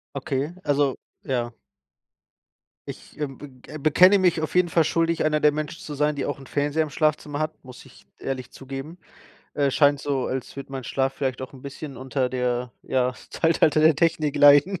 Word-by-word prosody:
Okay, 140 +3 -2
also 145 -2 +1 0.3
ja. 120 -3 -2 1.4
Ich, - - -11
ähm, 140 -3 -4
be 145 -2 -11 0.2
äh, - - -7
bekenne 180 +7 +5
mich 180 -4 +2
auf 155 +1 -4
jeden 180 -1 +4
Fall 165 -1 +3
schuldig, 165 0 +1
einer 150 -1 +1
der 150 - +5
Menschen 155 +2 -5
zu 150 - -7
sein, 150 +1 0
die 140 - -2
auch 145 - -4
'n 135 - -13
Fernseher 145 +2 0
im 155 - -6
Schlafzimmer 150 -1 -1
hat, 155 +1 -2
muss 125 -1 -12
ich - - -19
ehrlich 130 -1 -5
zugeben. 135 +5 -8 0.6
Äh, 140 -1 +1
scheint 145 +1 +3
so, 140 -3 -1
als 130 +1 -5
würde 140 0 -8
mein 135 -1 -4
Schlaf 135 +2 -1
vielleicht 130 -3 -2
auch 130 - -7
'n 130 -2 -14
bisschen 140 0 -8
unter 130 0 -2
der, 125 -1 -2
ja, 125 -1 0 0.2
Zeitalter 160 -2 +2
der 155 0 +6
Technik 155 -1 +1
leiden 145 +6 +6
145 Hz, 190 wpm, -24 LUFS, 135-155 Hz, 1.4 s, der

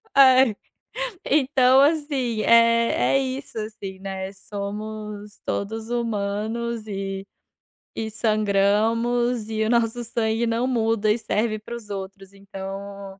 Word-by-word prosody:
Ai, 260 -4 +7 0.7
então, 265 -2 +4
assim, 280 -7 +1
eh, 230 0 +5 0.2
é - - +5
isso, 265 -1 -4
assim, 205 -3 -7
né. 190 0 -5
Somos 210 +1 -7
todos 220 +3 -3
humanos 225 0 -2
e 195 -1 -4 0.7
e 220 -1 -3
sangramos. 220 +2 +1
E 220 0 0
o - - 0
nosso 235 0 +1
sangue 225 0 0
não 230 +2 0
muda 225 -3 +1
e 215 - +2
serve 215 -1 -1
para 215 +3 -7
os 225 -3 -10
outros. 195 -1 -7
Então 195 0 -8
220 Hz, 120 wpm, -24 LUFS, 200-235 Hz, 0.7 s, Ai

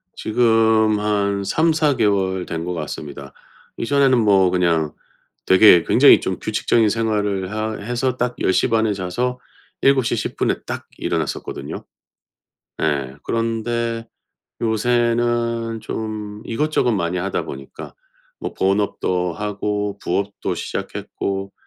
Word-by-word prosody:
지금 110 -2 +3
한 100 -1 0
3-4 155 +1 +2
개월 95 -4 +1
된 80 0 -4
것 90 - -3
같습니다. 70 -4 -7 0.4
이전에는 135 +1 +3
뭐 100 -4 +4
그냥 85 -4 +1 0.5
되게 95 -2 +7
굉장히 - - +6
좀 - - -3
규칙적인 115 -2 +1
생활을 105 -3 -1
하 110 0 -2
해서 120 +4 -2
딱 125 0 -1
10:30 110 +3 +2
에 105 - +1
자서 120 +7 -2 0.4
7:10 130 -5 +1
에 - - -5
딱 - - -6
일어났었거든요. - - -4 1.0
예. 70 -4 -1
그런데 115 0 -2 0.5
요새는 115 0 0
좀 110 -1 -5
이것저것 145 +1 +1
많이 90 -4 -1
하다 95 +2 -2
보니까 70 0 -9 0.4
뭐 - - -5
본업도 95 -2 0
하고 105 +1 -3
부업도 100 +3 -2
시작했고 95 0 -4
105 Hz, 220 characters per minute, -21 LUFS, 95-115 Hz, 1.0 s, 되게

